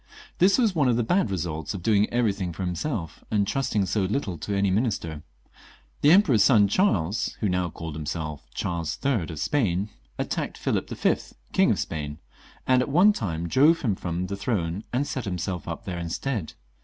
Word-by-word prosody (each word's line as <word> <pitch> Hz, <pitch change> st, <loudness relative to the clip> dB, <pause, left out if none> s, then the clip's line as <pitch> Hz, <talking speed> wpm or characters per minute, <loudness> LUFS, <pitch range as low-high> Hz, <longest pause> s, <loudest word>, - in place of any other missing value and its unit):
This 190 Hz, +2 st, +5 dB
was 230 Hz, -6 st, +3 dB
one 150 Hz, -6 st, +2 dB
of 120 Hz, -, +3 dB
the 120 Hz, -, +1 dB
bad 180 Hz, -, +2 dB
results 80 Hz, -2 st, -3 dB
of 90 Hz, -, -7 dB
doing 105 Hz, 0 st, +3 dB
everything 100 Hz, -7 st, 0 dB
for 95 Hz, +3 st, -4 dB
himself, 90 Hz, -, -3 dB
and 105 Hz, -2 st, +2 dB
trusting 110 Hz, -6 st, 0 dB
so 100 Hz, +3 st, 0 dB
little 95 Hz, -1 st, -1 dB
to 100 Hz, -1 st, -2 dB
any 100 Hz, -1 st, +2 dB
minister. 95 Hz, -, -1 dB, 0.8 s
The 145 Hz, -, +5 dB
Emperor's 155 Hz, -, +6 dB
son 105 Hz, -3 st, +5 dB
Charles, 100 Hz, -, +1 dB
who 105 Hz, -, +1 dB
now 90 Hz, -1 st, 0 dB
called 80 Hz, 0 st, -7 dB
himself 75 Hz, -2 st, -5 dB
Charles 85 Hz, -2 st, -2 dB
III. 115 Hz, -12 st, +1 dB
of 80 Hz, -, -6 dB
Spain, 100 Hz, -, 0 dB, 0.3 s
attacked -, -, -3 dB
Philip -, -, -1 dB
v., -, -, +2 dB, 0.4 s
King -, -, +4 dB
of -, -, +2 dB
Spain, 75 Hz, -2 st, -4 dB, 0.5 s
and 130 Hz, -1 st, +4 dB
at 130 Hz, -, -2 dB
one 180 Hz, +9 st, +6 dB
time 85 Hz, -, -3 dB
drove 150 Hz, -, +4 dB
him 110 Hz, -6 st, +2 dB
from 90 Hz, -1 st, -3 dB
the 100 Hz, +2 st, -4 dB
throne 100 Hz, -3 st, -2 dB
and 130 Hz, +4 st, 0 dB
set 130 Hz, -4 st, -4 dB
himself 90 Hz, -1 st, -3 dB
up 85 Hz, +7 st, -5 dB
there 90 Hz, -4 st, -4 dB
instead. 85 Hz, -, -3 dB
100 Hz, 185 wpm, -26 LUFS, 85-125 Hz, 0.8 s, Emperor's